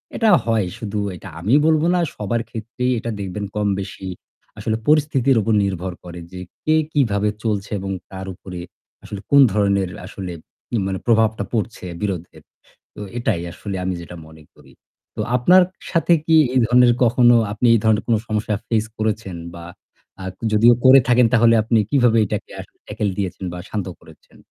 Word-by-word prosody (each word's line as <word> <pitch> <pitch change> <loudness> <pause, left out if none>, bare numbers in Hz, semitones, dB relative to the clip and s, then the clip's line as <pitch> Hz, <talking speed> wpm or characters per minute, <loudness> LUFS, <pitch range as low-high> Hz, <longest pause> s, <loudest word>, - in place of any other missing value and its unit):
এটা 225 -2 +2 0.2
হয়। 110 -4 +1
শুধু 105 -2 -4 0.2
এটা - - -10
আমি 105 +9 0
বলব 155 -1 +3
না। - - +2 0.2
সবার 110 +3 -2
ক্ষেত্রেই 120 +3 -3
এটা 115 - -4
দেখবেন 100 +1 -4
কমবেশি 100 -2 -3 0.5
আসলে 110 - -1
পরিস্থিতির 140 -4 +3
উপর 110 +1 0
নির্ভর 95 -2 -3
করে 90 0 -9
যে 90 - -8 0.3
কে 155 0 +3 0.2
কিভাবে 105 -7 +1
চলছে 105 -2 -2
এবং 95 0 -5 0.2
তার 95 0 -7
উপরে 90 0 -9 0.4
আসলে 105 - -7
কোন 140 0 +7
ধরনের 100 -3 +1 0.2
আসলে 90 -3 -7 0.5
মানে 95 -1 -3
প্রভাবটা 110 -2 +2
পড়ছে 110 -3 -3 0.2
বিরোধে। 90 -4 -4 0.6
তো - - -11 0.2
এটাই 85 -7 -1
আসলে 100 -2 -6
আমি 95 0 -1
যেটা 85 +1 -10
মনে 80 -1 -15
করি। - - -19 0.4
তো - - -4 0.2
আপনার 180 +9 +6 0.3
সাথে 170 0 +2
কি 160 -1 +4 0.2
এই - - +4
ধরনের 125 0 +5
কখনো 120 0 +5 0.2
আপনি 115 +4 0
এই - - +4
ধরনের 110 -1 +3
কোনো 115 -2 +3
সমস্যা 105 0 -1
face 110 -1 0
করেছেন? 110 -4 -2 0.2
বা 85 -1 -9 0.6
আ - - -7 0.3
যদিও 115 +3 +6
করে 130 +1 +8
থাকেন 120 -1 +5
তাহলে 115 0 +5
আপনি 115 +1 +1
কীভাবে 120 -5 +3
এটাকে 105 0 -5
আসলে - - -14
tackle 105 -1 -2
দিয়েছেন 95 -1 -4
বা 90 - -6
শান্ত 105 -3 -3
করেছেন? - - -19
110 Hz, 165 wpm, -20 LUFS, 95-120 Hz, 0.6 s, করে